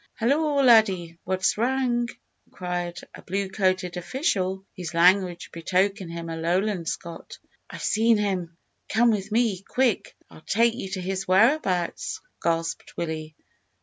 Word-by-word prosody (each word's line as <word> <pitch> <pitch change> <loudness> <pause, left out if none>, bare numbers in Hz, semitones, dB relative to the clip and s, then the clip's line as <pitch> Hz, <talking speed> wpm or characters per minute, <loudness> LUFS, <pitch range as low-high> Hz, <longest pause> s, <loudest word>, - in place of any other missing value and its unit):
"Hallo! 285 +4 +2
laddie, 190 -9 +4
what's 185 +2 0
wrang?" 240 -1 +1 0.4
inquired 175 -2 -4
a - - -11
blue 195 +1 -2
coated 185 -2 0
official, 190 - -1
whose 175 -4 -6
language 180 +1 +3
betokened 185 +2 0
him 170 0 -6
a 165 - -4
Lowland 175 +2 0
Scot. 170 -1 -7 0.3
"I've - - -8
seen 225 +1 +3
him; 185 -5 -2 0.3
come 235 +2 +4
with 205 -2 -2
me 220 -5 +1
quick! 245 +1 0
I'll - - -15
take 230 +7 +2
you 230 -5 -6
to 190 - -2
his 190 +1 -3
whereabouts," 190 - +2 0.2
gasped 165 0 -2
Willie. 155 -2 -4
190 Hz, 135 wpm, -25 LUFS, 175-225 Hz, 0.4 s, laddie